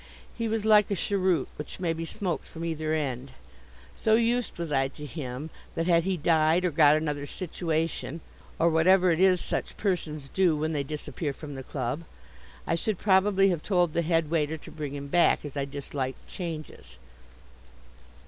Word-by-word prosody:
He 230 -1 -2
was 220 -1 -1
like 210 -2 +6
a 200 - 0
cheroot, 185 -6 +1
which 150 - -7
may 170 -3 0
be 165 0 -4
smoked 185 0 -3
from 165 0 -6
either 155 -1 -2
end. 135 -3 -3 0.6
So 220 0 +3
used 235 -1 +1
was 170 -2 -4
I 135 -1 +2
to 150 +2 -10
him 145 0 -6 0.2
that, 165 - 0
had 170 -1 +3
he 190 -1 0
died 160 +2 +3
or 180 - +1
got 150 -1 +6
another 150 -2 -2
situation 165 -2 -2 0.4
(or 165 - +3
whatever 180 +3 +5
it 165 - +1
is 185 -1 +5
such - - -3
persons 155 -8 -2
do 180 -3 +2
when 155 +2 -1
they 145 - 0
disappear 150 +1 -4
from 145 +1 -8
the 135 - -6
club), 130 +4 -3 0.6
I - - 0
should 190 +4 -1
probably 195 0 +4
have 175 -4 -1
told 175 -4 +1
the 170 - +2
head 165 -2 +1
waiter 160 -1 +1
to - - -12
bring 145 -3 -5
him 140 0 -6
back, 170 0 +3
as 145 - -7
I 140 -1 -1
disliked 140 -1 -5
changes. 165 - -7
165 Hz, 180 wpm, -28 LUFS, 150-185 Hz, 0.6 s, like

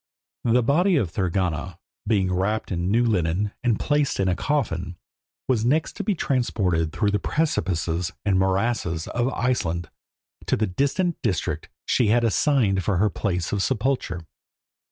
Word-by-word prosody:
The 120 +1 +3
body 175 - +3
of 105 - +1
Thorgunna, 90 -2 -1 0.3
being 95 -4 +2
wrapped 100 +5 -1
in 90 0 -1
new 120 +4 +3
linen 95 -1 +1
and 120 -4 +2
placed 145 -1 +1
in 95 - +2
a 90 - +2
coffin, 90 - -2 0.5
was 120 -4 +1
next 150 +7 +1
to - - -2
be 210 - 0
transported 95 - 0
through 105 +4 0
the 105 - +1
precipices 90 - -1
and 95 -2 +3
morasses 95 -3 0
of 120 +2 0
Iceland 90 - -1 0.6
to - - +2
the 110 - +1
distant 140 - 0
district 100 -8 -2 0.2
she 120 - +2
had 120 +3 +3
assigned 115 -4 +2
for 100 -1 +1
her 105 +2 +2
place 90 -4 -2
of 100 - 0
sepulture. 110 -6 -1
105 Hz, 155 wpm, -24 LUFS, 90-125 Hz, 0.6 s, The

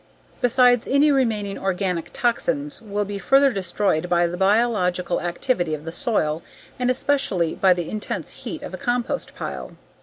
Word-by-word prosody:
Besides, 245 -1 +4
any 285 +2 +4
remaining 220 -7 0
organic 185 -3 -1
toxins 255 +4 -1
will 205 -2 -2
be 200 0 -5
further 270 +8 +4
destroyed 185 -3 0
by 175 0 +3
the 170 +1 -2
biological 190 -3 +1
activity 175 -1 -1
of 150 +1 -11
the 165 - -4
soil 170 - -1 0.4
and 250 0 +1
especially 255 - +1
by 190 -1 +4
the 175 -2 -3
intense 215 -1 -4
heat - - -6
of - - -7
a - - -4
compost 245 0 -2
pile. - - -6
205 Hz, 155 wpm, -23 LUFS, 175-245 Hz, 0.4 s, Besides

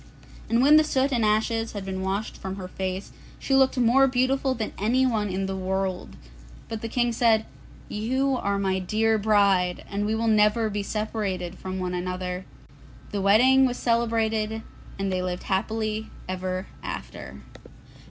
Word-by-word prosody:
And 230 +2 +3
when 295 +3 +7
the 310 - +6
soot 275 -2 +1
and 240 -4 +1
ashes 225 +2 +1
had 200 -2 -5
been 190 -1 -4
washed 195 +3 -2
from 190 0 -6
her 190 -2 -6
face, 185 +1 -4 0.3
she 270 - -2
looked 265 0 +4
more 250 +3 +5
beautiful 260 +1 +1
than 220 -3 -4
anyone 225 -1 +1
in 190 +1 -2
the 195 0 -3
world. 190 0 -3 0.5
But 220 -1 -5
the 230 - -4
King 240 +1 +1
said, 225 -2 +3 0.4
'You 260 +6 0
are 200 -3 -1
my 190 -1 0
dear 220 +4 +1
bride, 200 -4 +2
and 205 +1 -2
we 220 - 0
will 230 +1 -1
never 215 +1 +3
be 205 0 -2
separated 200 -4 -3
from 185 0 -5
one 180 -1 -2
another.' 180 0 -3
So - - -24 0.4
the 205 - -2
wedding 255 +7 +5
was 250 0 -3
celebrated 225 -2 0 0.3
and 195 -1 -2
they 185 0 0
lived 180 -1 -3
happily 215 +2 -1 0.2
ever 185 0 -3 0.2
after. - - -7
215 Hz, 165 wpm, -25 LUFS, 190-230 Hz, 0.5 s, when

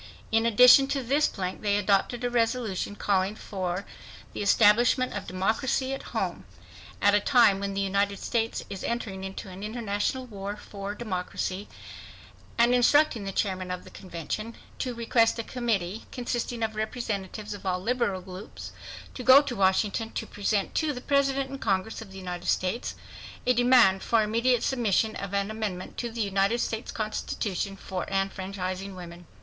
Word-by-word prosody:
." - - -22
In 225 +1 +3
addition 250 +4 +8
to 275 -1 -1
this 280 +5 +3
plank 185 -2 -4
they 205 -1 +2
adopted 205 +4 +1
a 245 - +1
resolution 230 -4 0
calling 195 0 +1
for 190 -3 -4 0.5
the - - -4
establishment 230 +5 +4
of - - -5
democracy 225 +8 0
at 270 - -4
home - - -2 0.6
"at 205 - +6
a 205 - +5
time 225 -4 +4
when 200 0 -3
the 200 - 0
United 200 +1 +1
States 225 +3 -1
is 195 - -7
entering 220 -5 -3
into 190 +1 -6
an 185 +1 -9
international 215 +3 -2
war 200 -3 -6
for 200 -1 -7
democracy" 190 -2 -3 0.9
and 235 +1 +5
instructing 250 -2 +4
the 195 - -3
chairman 185 -2 -1
of 180 0 -4
the - - -14
convention 190 +5 -6 0.2
"to 250 -2 -2
request 230 0 +2
a 230 - -2
committee 220 -5 -2
consisting 240 -1 -3
of 220 -1 -2
representatives 215 -2 -4
of 205 - -9
all 185 -1 0
liberal 205 -2 0
groups 185 +2 -9 0.4
to - - -6
go 260 +2 +9
to 270 -4 -4
Washington 200 +3 +1
to - - -3
present 205 0 -1
to 310 -2 0
the 250 - -6
President 275 -1 +1
and 275 - -6
the - - -7
Congress 195 +4 -1
of 210 -3 -10
the 190 - -10
United 180 -1 -6
States 185 +6 0 0.5
a 250 - +4
demand 245 -6 +5
for 225 -2 +2
immediate 230 +3 +2
submission 220 -4 +1
of 200 -1 -5
an 200 +1 0
amendment 210 -5 -4
to 240 - -3
the 230 0 -4
United 200 +2 +1
States 225 -1 -3
constitution 205 -2 -3
enfranchising 195 0 -3
women." 175 -1 -10
210 Hz, 165 wpm, -27 LUFS, 195-240 Hz, 0.9 s, go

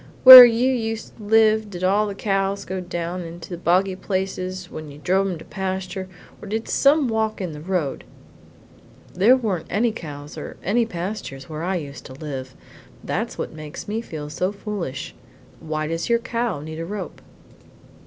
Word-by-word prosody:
"Where 255 -1 +14
you 240 +2 +2
used 225 -3 -3
to 215 - -12
live 220 0 +3
did 180 -2 -7
all 205 +3 +2
the 200 - -5
cows 195 -1 -1
go 190 +1 -4
down 175 0 -4
into 170 +1 -9
the 175 - -4
boggy 185 +2 +1
places 185 -1 -4
when 155 -1 -8
you 140 - -11
drove 190 +6 +1
em 180 - -4
to 160 - -12
pasture, 190 0 -4 0.3
or - - -9
did 220 +3 -3
some 285 0 +3
walk 220 -1 -1
in 180 -4 -4
the 150 -1 -9
road?" 165 -5 -2 1.1
"There 220 +8 +5
weren't 200 -10 -3
any 225 +5 +1
cows 150 -8 -8
or - - -8
any 225 +5 +1
pastures 175 -8 -6
where 155 0 -6
I 185 +3 -1
used 140 -6 -6
to 130 - -11
live; 130 -2 -7 0.5
that's - - -3
what - - -4
makes 155 +1 -9
me 215 +2 -2
so 155 -1 -4
foolish; 200 - -5 0.5
why 155 -1 -3
does 165 +5 -3
your 235 - +4
cow 235 - -3
need 160 +1 -7
a 165 - -4
rope?" 200 -2 -6
185 Hz, 175 wpm, -22 LUFS, 160-215 Hz, 1.1 s, Where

